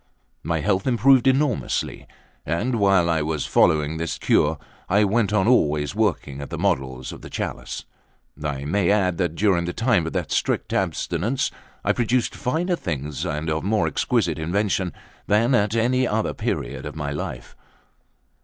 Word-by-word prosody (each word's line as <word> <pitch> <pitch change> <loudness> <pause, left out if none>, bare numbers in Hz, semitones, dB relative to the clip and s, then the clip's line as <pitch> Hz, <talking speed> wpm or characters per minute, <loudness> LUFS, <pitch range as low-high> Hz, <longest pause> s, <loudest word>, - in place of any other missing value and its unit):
My 80 0 -1
health 95 - 0
improved 130 +2 +4
enormously; 135 -1 0 0.4
and 115 - -1
while 95 -4 +4
I 80 -2 +1
was 75 -1 -2
following 75 -1 +2
this 85 0 -3
cure, 75 +1 +2 0.3
I 100 +3 +4
went 105 +1 +1
on 105 -1 +2
always 75 - +2
working 70 0 -1
at 70 - -7
the - - -5
models 65 -1 -1
of - - -10
the - - -10
chalice. - - -5 0.6
I 70 -2 -3
may 85 +4 +1
add 95 -4 +2
that, 85 -3 0
during 90 -3 +2
the 90 - -3
time 110 -8 +2
of - - -5
that - - -2
strict - - 0
abstinence, 135 +5 -1 0.3
I - - +2
produced 120 0 0
finer 165 +7 -1
things 75 - -4
and 75 0 -3
of 80 0 -1
more 100 -2 +1
exquisite 80 0 0
invention 95 +2 0 0.4
than 115 +5 +3
at 105 -2 +2
any 125 +2 +2
other 110 0 0
period - - -3
of - - -8
my 75 -2 -3
life. 75 - -6
95 Hz, 165 wpm, -23 LUFS, 80-115 Hz, 0.6 s, improved